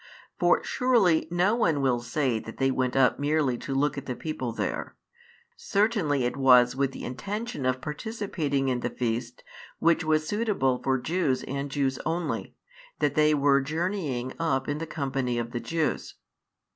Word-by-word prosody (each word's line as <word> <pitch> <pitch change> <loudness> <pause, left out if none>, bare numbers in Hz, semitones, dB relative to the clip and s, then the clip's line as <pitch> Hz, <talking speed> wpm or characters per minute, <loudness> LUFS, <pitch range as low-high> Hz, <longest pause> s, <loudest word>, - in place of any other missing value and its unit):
For - - +3
surely 225 - +2
no 180 +4 +2
one 175 -11 +2
will 130 -3 +2
say 120 0 -1
that 115 - -10
they 135 0 +2
went 130 -1 -1
up 135 -1 +3
merely 145 -3 +1
to 135 - -4
look 145 +1 +1
at - - -13
the 125 - -3
people 130 -6 -4
there; 115 - -3 0.6
certainly 200 - +1
it 120 - -1
was 125 -2 +5
with 135 0 0
the - - -8
intention 195 - -4
of 130 0 +1
|144 - - -22
participating 150 -6 -2
in 125 -2 0
the 120 - -2
feast 120 0 -3 0.3
which 165 +1 +3
was 155 0 +1
suitable 195 - 0
for 130 0 +1
Jews 145 -1 0
and 140 +1 -4
Jews 135 -1 -1
only, 165 +2 -3 0.4
that - - +1
they 155 -1 +4
were 140 -1 +4
journeying 150 -4 -2
up 145 -5 0
in 145 +1 -2
the 165 - -4
company 135 -5 -2
of 120 0 -3
the 120 - -3
Jews. 160 +4 -2
140 Hz, 170 wpm, -27 LUFS, 130-165 Hz, 0.6 s, was